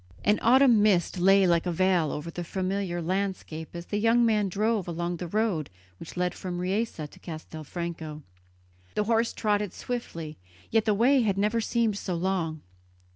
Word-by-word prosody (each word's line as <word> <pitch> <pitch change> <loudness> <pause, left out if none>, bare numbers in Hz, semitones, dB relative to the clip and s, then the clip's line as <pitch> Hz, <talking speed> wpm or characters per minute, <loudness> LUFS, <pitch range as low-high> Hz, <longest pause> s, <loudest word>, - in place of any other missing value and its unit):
An 210 +1 +3
autumn 245 -2 +6
mist 190 -4 +2
lay 195 +2 +5
like 170 0 +2
a - - +1
veil 175 -3 +2
over 150 +3 -5
the 175 - -5
familiar 185 -1 -2
landscape 185 -3 -3
as 170 0 -6
the 205 - -2
young 230 +2 +4
man 210 -3 +2
drove 210 0 0
along 175 +1 -2
the 175 - -5
road 200 -5 0 0.3
which 165 - -10
led 180 0 0
from 180 -2 -5
Riese 195 +6 -1
to - - -18
Castelfranco. 160 -1 -6 0.7
The 210 - +2
horse 230 +1 +2
trotted 205 -3 0
swiftly, 165 -11 -5 0.3
yet 225 -1 +3
the 215 -2 +3
way 255 +5 +4
had 200 -4 +1
never 215 +3 +1
seemed 225 -3 0
so 180 - -3
long. 170 -3 -1
190 Hz, 170 wpm, -27 LUFS, 170-215 Hz, 0.7 s, autumn